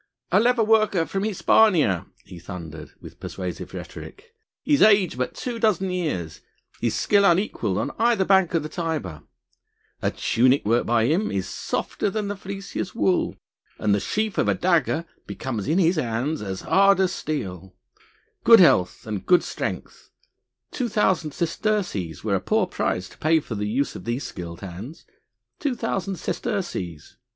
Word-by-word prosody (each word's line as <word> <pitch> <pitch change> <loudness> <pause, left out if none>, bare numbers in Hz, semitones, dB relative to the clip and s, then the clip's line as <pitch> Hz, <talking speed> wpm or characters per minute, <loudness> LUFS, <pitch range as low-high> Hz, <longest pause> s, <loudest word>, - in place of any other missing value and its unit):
"A 185 - +5
leather 240 +1 +3
worker 215 -5 +3
from 195 +6 -3
Hispania," 170 - +3 0.2
he 90 -2 -11
thundered 85 -3 -9
with - - -12
persuasive 90 -2 -6
rhetoric, 470 -1 -10 0.3
"his 290 -2 +2
age 205 -7 +5
but 125 0 -3
two 240 -2 -4
dozen 195 -4 +1
years, 120 - -3 0.4
his 120 -2 0
skill 200 -1 +3
unequalled 170 - +1
on - - -1
either 230 -4 +3
bank 190 -3 +3
of 165 - +1
the - - -4
Tiber... 155 - -4 0.8
A - - +1
tunic 130 +4 +2
worked 115 +3 +2
by 115 -1 +3
him 175 - +1
is 95 -2 -2
softer - - -2
than 210 0 -3
the 205 - -3
fleeciest 195 0 -6
wool, 190 -5 +1 0.4
and 105 -1 +1
the 100 - +2
sheath 215 - -2
of - - +2
a - - +2
dagger 170 -2 +1 0.2
becomes 115 -7 -4
in 160 - +2
his 175 -1 +3
hands 130 +4 -1
as 95 -2 -5
hard 195 0 +4
as 190 -1 +2
steel.... 95 - -5 0.7
Good 230 -1 +8
health 90 - +4
and 105 -3 -4 0.2
strength, - - -5 0.6
two 250 -3 -2
thousand 190 -7 +1
sesterces 170 - -2
were - - 0
a - - +2
poor - - +1
price 90 +1 -2
to - - -18
pay 160 +1 +3
for 135 - -7
the 105 -1 -2
use 130 +7 -1
of - - -9
these 120 +4 -2
skilled 85 -2 -7
hands.... 100 - -9 0.5
Two 285 -4 -1
thousand 195 -5 -2
sesterces.... 130 - -4
165 Hz, 160 wpm, -24 LUFS, -, 0.8 s, Good